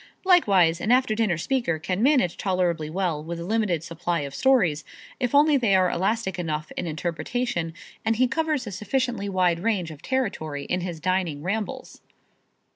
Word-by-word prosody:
Likewise, 195 Hz, -, +4 dB
an 220 Hz, -, 0 dB
after 255 Hz, -3 st, +3 dB
dinner 215 Hz, -6 st, +1 dB
speaker 235 Hz, -, 0 dB
can 180 Hz, +5 st, -2 dB
manage 255 Hz, -, +3 dB
tolerably 175 Hz, -5 st, -1 dB
well 170 Hz, -3 st, -1 dB
with 170 Hz, +1 st, -5 dB
a -, -, -5 dB
limited 195 Hz, -5 st, 0 dB
supply 170 Hz, 0 st, -2 dB
of 140 Hz, -1 st, -6 dB
stories, 180 Hz, -, +2 dB, 0.4 s
if 250 Hz, +1 st, 0 dB
only 295 Hz, 0 st, +5 dB
they 225 Hz, -7 st, +3 dB
are 185 Hz, -1 st, +3 dB
elastic 190 Hz, +1 st, -1 dB
enough 155 Hz, -3 st, -3 dB
in 180 Hz, -, -3 dB
interpretation 170 Hz, +3 st, -2 dB, 0.3 s
and 225 Hz, 0 st, +1 dB
he 255 Hz, +3 st, +3 dB
covers 310 Hz, 0 st, -1 dB
a 210 Hz, -, -6 dB
sufficiently 210 Hz, +1 st, -2 dB
wide 180 Hz, -3 st, +2 dB
range 185 Hz, -5 st, -1 dB
of 150 Hz, -, -11 dB
territory 190 Hz, -, -2 dB
in 180 Hz, -, -1 dB
his 175 Hz, -2 st, -5 dB
dining 175 Hz, -4 st, -1 dB
rambles. 205 Hz, +4 st, -4 dB
185 Hz, 170 wpm, -25 LUFS, 170-230 Hz, 0.4 s, only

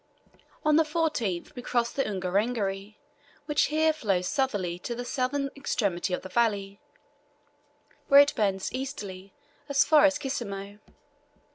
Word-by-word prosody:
On 305 Hz, 0 st, +5 dB
the 325 Hz, -, +5 dB
14th 300 Hz, -, -2 dB
we 250 Hz, -, -7 dB
crossed 240 Hz, -1 st, -1 dB
the 275 Hz, -, +1 dB
Ungerengeri, 200 Hz, +1 st, -2 dB, 0.5 s
which 295 Hz, 0 st, +2 dB
here 315 Hz, +1 st, +2 dB
flows 195 Hz, -11 st, 0 dB
southerly 200 Hz, -11 st, -1 dB
to 235 Hz, +6 st, -5 dB
the 245 Hz, +1 st, -5 dB
southern 275 Hz, +2 st, -1 dB
extremity 200 Hz, -10 st, -1 dB
of 180 Hz, -, -2 dB
the -, -, -6 dB
valley, 200 Hz, -3 st, 0 dB, 1.3 s
where 280 Hz, 0 st, +9 dB
it 285 Hz, -, +2 dB
bends 195 Hz, -3 st, 0 dB
easterly 200 Hz, -8 st, -6 dB, 0.4 s
as 280 Hz, -1 st, +4 dB
far 305 Hz, -1 st, +6 dB
as 285 Hz, -1 st, +3 dB
Kisemo. 205 Hz, -6 st, -5 dB
235 Hz, 135 wpm, -27 LUFS, 195-280 Hz, 1.3 s, where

